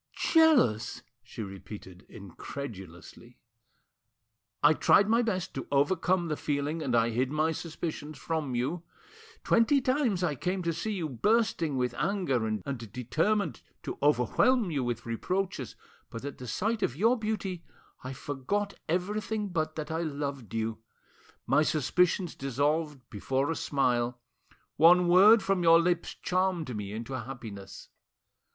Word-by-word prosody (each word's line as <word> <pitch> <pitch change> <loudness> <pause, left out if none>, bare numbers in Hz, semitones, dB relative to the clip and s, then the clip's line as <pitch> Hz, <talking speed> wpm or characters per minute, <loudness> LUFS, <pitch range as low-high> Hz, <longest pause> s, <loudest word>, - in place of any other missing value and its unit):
"Jealous!" 265 - +4 0.2
she 115 -1 -8
repeated 95 -1 -10
incredulously. 100 +1 -9 1.3
"I 145 +2 +7
tried 200 +5 +4
my 230 +2 +3
best 190 -6 -2
to 135 - -5
overcome 175 +5 +2
the 155 - -1
feeling, 145 +2 -2
and 130 -5 0
I 115 0 +3
hid 125 +3 0
my 155 +2 +1
suspicions 155 -2 -5
from 155 -6 -3
you. 140 +8 -1 0.6
Twenty 235 +5 +4
times 255 -8 0
I 165 -4 +1
came 180 +7 -2
to 170 0 0
see 210 +7 -3
you 175 -5 -2
bursting 165 - +1
with 125 -1 0
anger 170 - 0
and 110 -1 -3 0.3
determined 165 - -1 0.2
to - - -6
overwhelm 170 - +3
you 140 -4 -1
with 120 -1 -3
reproaches, 145 - -3 0.3
but 115 +4 -7
at 140 - -7
the 125 - -8
sight 215 - -1
of 130 - 0
your 225 - +3
beauty 210 -6 -3 0.4
I 130 - -5
forgot 145 +10 -3 0.2
everything 210 +4 -1
but 155 -3 -2
that 155 0 -5
I 160 +1 -1
loved 140 - -4
you. 110 0 -2 0.7
My - - +3
suspicions 165 +4 +1
dissolved 145 +1 -1
before 135 +8 -1
a - - -2
smile; 125 -5 0 0.6
one 175 +3 +6
word 195 +5 +7
from 195 -1 +1
your 165 -1 +7
lips 170 0 0
charmed 180 -8 -1
me 100 -1 -5
into 115 +5 -6
happiness. 115 -6 -8
155 Hz, 140 wpm, -29 LUFS, 125-185 Hz, 1.3 s, I